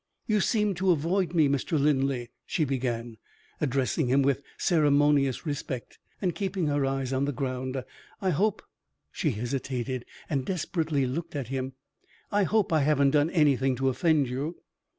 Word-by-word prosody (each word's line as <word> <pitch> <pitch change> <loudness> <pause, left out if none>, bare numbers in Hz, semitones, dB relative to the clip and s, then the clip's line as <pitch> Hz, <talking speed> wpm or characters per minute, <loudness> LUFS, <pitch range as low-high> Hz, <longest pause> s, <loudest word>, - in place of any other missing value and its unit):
"You 215 -2 +2
seem 210 -2 +2
to 190 - +2
avoid 175 +2 +1
me, 155 -3 +5
Mr. 140 +3 0
Linley," 135 -4 +1 0.2
she 155 - +1
began, 120 -4 -2 0.4
addressing 135 +1 0
him 135 +3 +3
with 140 0 +1 0.2
ceremonious 145 -4 +3
respect, 140 -4 -5 0.2
and 180 -3 0
keeping 195 -3 -2
her 145 -2 +1
eyes 135 -1 -2
on 135 +1 +1
the 145 - -1
ground. 130 0 -3 0.4
"I 190 -2 +1
hope 205 +6 +1 0.3
" - - -53
she 155 - 0
hesitated, 125 +1 -3 0.2
and 140 -4 -1
desperately 160 -4 -1
looked 165 +6 -4
at 135 -5 -3
him 130 0 -3 0.6
"I 205 -1 +3
hope 210 -2 +1
I 155 - +4
haven't 140 -1 +3
done 150 +2 +3
anything 135 -6 +3
to 135 +1 +1
offend 145 +2 +2
you?" 140 +7 -3
140 Hz, 160 wpm, -28 LUFS, 130-165 Hz, 0.6 s, me